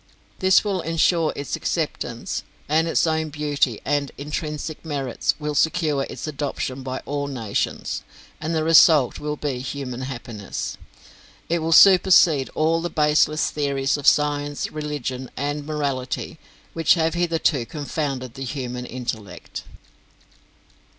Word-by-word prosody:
This 190 0 +5
will 195 -4 -1
ensure 165 0 +2
its 140 -2 -3
acceptance - - -3 0.3
and 160 +2 +2
its 165 - +2
own 160 -1 0
beauty 145 -5 0
and 145 -1 0
intrinsic 150 +1 -4
merits 140 -6 -1
will 150 -1 -3
secure 150 -1 +2
its - - -6
adoption 140 -3 -3
by 130 0 -5
all 145 0 -2
nations, 115 -7 -2 0.4
and 160 +1 -2
the 160 - +1
result 155 -4 +6
will 150 0 -3
be 145 -4 -3
human 130 -1 -5
happiness. 120 -6 -5 0.7
It 170 +1 +2
will 165 +1 -2
supersede 175 -6 +7
all 165 +1 +2
the 175 - -2
baseless 150 0 +2
theories 140 -2 0
of 145 -1 -3
science, 145 -1 +2
religion, 145 -4 -4
and 145 +1 -2
morality 140 -4 -3 0.3
which 165 +1 +4
have 165 -1 +1
hitherto 165 -7 +1
confounded 140 -4 -3
the 135 - -6
human 125 -2 -4
intellect. 120 -5 -6
145 Hz, 130 wpm, -23 LUFS, 135-160 Hz, 0.7 s, supersede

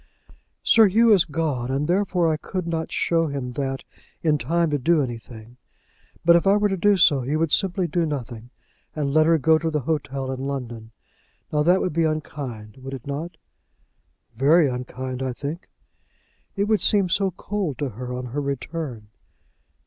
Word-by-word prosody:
"Sir 225 -2 +6
Hugh 225 +3 +5
is 190 -4 +4
gone, 145 -6 -2
and 140 +3 -1
therefore 180 -3 +1
I - - +1
could 180 +3 -5
not 165 -1 -3
show 165 -1 +1
him 140 -4 -4
that 135 +1 -3 0.4
in 150 -3 +2
time 165 +6 0
to 145 - 0
do 155 +2 +3
anything; 115 -1 -8 0.7
but 170 0 +7
if 170 +3 +2
I 200 +1 +5
were 210 0 +2
to 195 - 0
do 200 +2 +3
so, 150 -6 +5
he 135 +5 -2
would 160 -1 0
simply 190 -2 +1
do 170 -1 0
nothing, 125 -5 -6 0.5
and 145 -3 -1
let 155 0 +4
her 165 0 +5
go 160 +2 +3
to 165 - -1
the 150 -2 -1
hotel 135 -2 -2
in 130 - -5
London. 120 -5 -5 0.6
Now 150 - +2
that 175 +5 +4
would 180 - -1
be 165 +1 +1
unkind; 135 -8 -5
would 135 +1 -7
it 130 - -11
not?" 150 +5 -5 1.0
"Very 150 +6 +4
unkind, 130 0 -5
I 130 -1 -2
think." 145 +7 -6 0.9
"It 200 - +1
would 215 0 +1
seem 200 -3 +4
so 195 +2 +1
cold 190 -5 -4
to 145 -2 -2
her 125 +3 -7
on 125 0 -4
her 145 - -1
return." 140 -4 -5
150 Hz, 180 wpm, -23 LUFS, 130-170 Hz, 1.0 s, but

